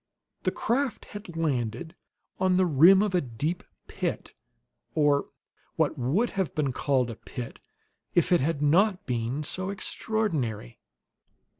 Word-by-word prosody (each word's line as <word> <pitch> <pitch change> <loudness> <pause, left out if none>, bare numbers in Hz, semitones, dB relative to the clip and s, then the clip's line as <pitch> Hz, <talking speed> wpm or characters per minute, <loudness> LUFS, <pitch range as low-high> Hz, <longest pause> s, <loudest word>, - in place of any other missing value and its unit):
The - - 0
craft 250 -1 -1
had 205 -5 -9
landed 135 -1 -1 0.5
on 185 -1 +3
the 185 0 +4
rim 175 +6 +6
of 210 -3 -1
a 180 - +3
deep 145 +8 -3 0.2
pit, - - -4 0.6
or 145 -2 +3 0.5
what - - +1
would 155 - +1
have 190 -4 -2
been 145 -3 +1
called 125 -2 +1
a - - -7
pit 120 +2 -8 0.6
if 175 +1 +3
it 175 - +5
had 145 0 0
not 185 +6 +3
been 125 +3 -2
so 185 +5 -2
extraordinary. 165 - -2
160 Hz, 135 wpm, -27 LUFS, 130-190 Hz, 0.6 s, rim